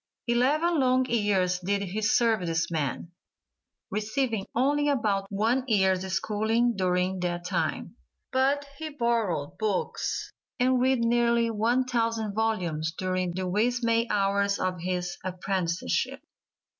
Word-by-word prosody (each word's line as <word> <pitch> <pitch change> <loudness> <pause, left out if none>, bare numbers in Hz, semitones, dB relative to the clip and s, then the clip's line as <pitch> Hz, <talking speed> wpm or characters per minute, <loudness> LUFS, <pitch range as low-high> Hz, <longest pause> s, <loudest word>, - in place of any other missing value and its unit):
Eleven 290 +8 +2
long 255 -1 +3
years 200 -6 +1
did 200 +2 -1
he 200 +3 -3
serve 220 +1 +3
this 165 0 -1
man, 155 +1 -2 0.8
receiving 215 0 -1
only 290 +4 +2
about 210 -8 0
one 225 +6 +1
year's 190 -5 +3
schooling 220 +4 +1
during 185 0 0
that 175 -1 -2
time, 180 0 -2 0.4
but 275 +2 +2
he 315 0 -4
borrowed 230 - -1
books 210 -3 -2 0.3
and 255 0 +3
read 260 -1 +2
nearly 235 0 +2
one 230 +4 +2
thousand 230 -4 -1
volumes 180 -8 -1
during 185 -1 -1
the 185 +1 -3
"wee 210 +6 +2
sma' 230 -1 +1
hours" 200 0 +1
of 185 -1 -2
his 180 0 -3
apprenticeship. 185 - -2
215 Hz, 125 wpm, -27 LUFS, 185-240 Hz, 0.8 s, long